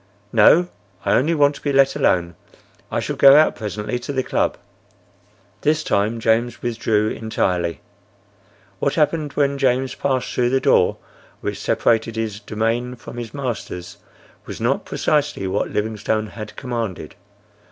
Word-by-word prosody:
"No, 175 Hz, +2 st, +6 dB, 0.4 s
I -, -, +2 dB
only 155 Hz, +7 st, +2 dB
want 145 Hz, -1 st, +4 dB
to -, -, -12 dB
be 145 Hz, -, -1 dB
let 135 Hz, 0 st, +4 dB
alone. 85 Hz, -1 st, +1 dB, 0.6 s
I -, -, 0 dB
shall -, -, -3 dB
go 135 Hz, 0 st, +8 dB
out 155 Hz, +1 st, +5 dB
presently 105 Hz, +2 st, -4 dB
to 125 Hz, -, -5 dB
the 130 Hz, -2 st, -1 dB
club." -, -, 0 dB, 1.0 s
This 155 Hz, +1 st, +1 dB
time 110 Hz, 0 st, 0 dB
James 115 Hz, +2 st, 0 dB
withdrew 110 Hz, -3 st, 0 dB
entirely. 90 Hz, -7 st, -1 dB, 1.0 s
What 140 Hz, -, 0 dB
happened 150 Hz, -1 st, +1 dB
when 140 Hz, -1 st, +1 dB
James 130 Hz, -1 st, +1 dB
passed 130 Hz, -2 st, -1 dB
through 120 Hz, -1 st, +1 dB
the 135 Hz, +1 st, +2 dB
door -, -, +3 dB, 0.4 s
which -, -, -4 dB
separated 115 Hz, 0 st, +1 dB
his 110 Hz, -2 st, -3 dB
domain 115 Hz, +4 st, -2 dB
from 120 Hz, 0 st, -11 dB
his 115 Hz, -2 st, -6 dB
master's 115 Hz, -10 st, -5 dB, 0.5 s
was -, -, -7 dB
not -, -, 0 dB
precisely 145 Hz, -9 st, 0 dB
what 95 Hz, -, -1 dB
Livingstone 110 Hz, 0 st, -1 dB
had 105 Hz, -1 st, -9 dB
commanded. 115 Hz, -, -4 dB
120 Hz, 145 wpm, -21 LUFS, 110-140 Hz, 1.0 s, go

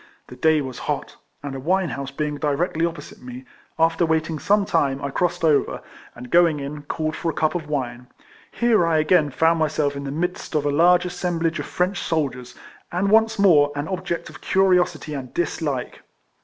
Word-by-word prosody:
The 125 Hz, -, -10 dB
day 155 Hz, +3 st, +3 dB
was 130 Hz, -2 st, -6 dB
hot, -, -, -3 dB, 0.3 s
and 140 Hz, -1 st, -5 dB
a 135 Hz, -, -5 dB
wine 180 Hz, +5 st, +1 dB
house 140 Hz, -1 st, -5 dB
being 150 Hz, +1 st, -3 dB
directly 160 Hz, +3 st, 0 dB
opposite 170 Hz, 0 st, -9 dB
me, 125 Hz, +1 st, -9 dB, 0.3 s
after 165 Hz, +2 st, +2 dB
waiting 160 Hz, -1 st, 0 dB
some 205 Hz, +4 st, +2 dB
time, 140 Hz, -7 st, +1 dB
I 140 Hz, -1 st, -4 dB
crossed 175 Hz, +3 st, -1 dB
over, 155 Hz, -3 st, +2 dB, 0.3 s
and, 125 Hz, 0 st, -10 dB
going 170 Hz, -3 st, +4 dB
in, 145 Hz, +2 st, -6 dB
called 155 Hz, +2 st, -3 dB
for 170 Hz, -, -2 dB
a 155 Hz, -, -4 dB
cup 155 Hz, +1 st, +1 dB
of 165 Hz, -4 st, -4 dB
wine. 125 Hz, -4 st, -3 dB, 0.4 s
Here 225 Hz, -8 st, +2 dB
I 165 Hz, -1 st, +2 dB
again 155 Hz, 0 st, +3 dB
found 160 Hz, +4 st, +2 dB
myself 150 Hz, -2 st, 0 dB
in 140 Hz, -, -5 dB
the -, -, -4 dB
midst 175 Hz, +2 st, -3 dB
of 150 Hz, -1 st, +1 dB
a 145 Hz, -, +2 dB
large 175 Hz, +4 st, +4 dB
assemblage 175 Hz, -2 st, -2 dB
of -, -, -5 dB
French 180 Hz, +2 st, -1 dB
soldiers, 130 Hz, -6 st, -2 dB, 0.4 s
and 190 Hz, +3 st, 0 dB
once 225 Hz, 0 st, +4 dB
more 155 Hz, -8 st, +5 dB
an 145 Hz, +2 st, -3 dB
object 185 Hz, -2 st, -3 dB
of -, -, -13 dB
curiosity 180 Hz, -5 st, +2 dB
and 130 Hz, -3 st, -6 dB
dis 175 Hz, -1 st, -1 dB
like. 140 Hz, -5 st, -3 dB
160 Hz, 195 wpm, -22 LUFS, 145-175 Hz, 0.4 s, more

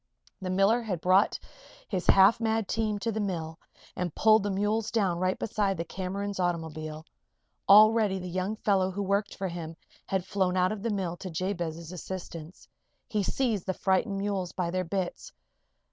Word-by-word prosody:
The 185 Hz, -, -4 dB
miller 195 Hz, +6 st, +3 dB
had 200 Hz, -7 st, -3 dB
brought 185 Hz, +4 st, +3 dB, 0.5 s
his 185 Hz, -3 st, -3 dB
half 195 Hz, +4 st, +6 dB
mad 225 Hz, -2 st, 0 dB
team 215 Hz, -2 st, -1 dB
to 230 Hz, +3 st, -2 dB
the 220 Hz, -, -3 dB
mill 165 Hz, -5 st, -3 dB, 0.4 s
and 180 Hz, -3 st, -3 dB
pulled 220 Hz, 0 st, +5 dB
the 205 Hz, -, -2 dB
mules 210 Hz, +3 st, 0 dB
down 195 Hz, -8 st, 0 dB
right 185 Hz, +1 st, 0 dB
beside 200 Hz, -3 st, -1 dB
the 165 Hz, -, -3 dB
Cameron's 195 Hz, +2 st, -4 dB
automobile. 160 Hz, -3 st, -3 dB, 0.6 s
Already 215 Hz, -1 st, +7 dB
the 180 Hz, -1 st, -6 dB
young 185 Hz, +4 st, -2 dB
fellow 195 Hz, -3 st, +1 dB
who 200 Hz, +2 st, -3 dB
worked 200 Hz, +1 st, 0 dB
for 195 Hz, -, -3 dB
him 165 Hz, -1 st, -6 dB, 0.3 s
had 190 Hz, -2 st, -1 dB
flown 185 Hz, -2 st, 0 dB
out 185 Hz, 0 st, +3 dB
of 215 Hz, -2 st, -4 dB
the 230 Hz, -, -1 dB
mill 185 Hz, -5 st, -2 dB
to 185 Hz, -, -7 dB
Jabez's 170 Hz, -2 st, -3 dB
assistance. 175 Hz, -2 st, -8 dB, 0.4 s
He 210 Hz, -, 0 dB
seized 215 Hz, -2 st, -1 dB
the 190 Hz, -, -1 dB
frightened 195 Hz, +2 st, +1 dB
mules 195 Hz, -3 st, -2 dB
by 175 Hz, -2 st, -2 dB
their 185 Hz, 0 st, -1 dB
bits. 190 Hz, -, -4 dB
190 Hz, 175 wpm, -28 LUFS, 180-205 Hz, 0.6 s, Already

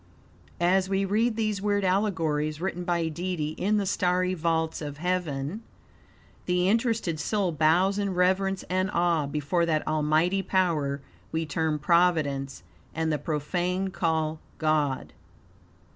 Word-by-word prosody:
As 185 Hz, +2 st, +2 dB
we 195 Hz, 0 st, +1 dB
read 220 Hz, +4 st, +1 dB
these 215 Hz, -3 st, -1 dB
weird 205 Hz, -1 st, +1 dB
allegories, 165 Hz, -6 st, 0 dB
written 180 Hz, 0 st, -3 dB
by 170 Hz, -2 st, 0 dB
Deity 165 Hz, -1 st, -3 dB
in 200 Hz, +7 st, 0 dB
the 205 Hz, -, 0 dB
starry 185 Hz, -1 st, +1 dB
vaults 160 Hz, -2 st, -1 dB
of 145 Hz, -1 st, -6 dB
heaven, 170 Hz, 0 st, -2 dB, 0.9 s
the 180 Hz, 0 st, +2 dB
interested 225 Hz, -6 st, +1 dB
soul 195 Hz, +2 st, 0 dB
bows 170 Hz, +6 st, +3 dB
in 200 Hz, -2 st, -1 dB
reverence 190 Hz, +1 st, +1 dB
and 185 Hz, +1 st, 0 dB
awe 170 Hz, -4 st, +1 dB
before 150 Hz, +4 st, 0 dB
that 155 Hz, -2 st, 0 dB
almighty 155 Hz, +5 st, +2 dB
power 155 Hz, -8 st, 0 dB, 0.3 s
we 160 Hz, 0 st, -1 dB
term 155 Hz, 0 st, -1 dB
Providence, 150 Hz, -4 st, +1 dB, 0.3 s
and 160 Hz, 0 st, 0 dB
the 150 Hz, -, -1 dB
profane 180 Hz, +5 st, -1 dB
call 160 Hz, -3 st, -1 dB, 0.2 s
God. 150 Hz, -4 st, 0 dB
175 Hz, 130 wpm, -27 LUFS, 155-190 Hz, 0.9 s, bows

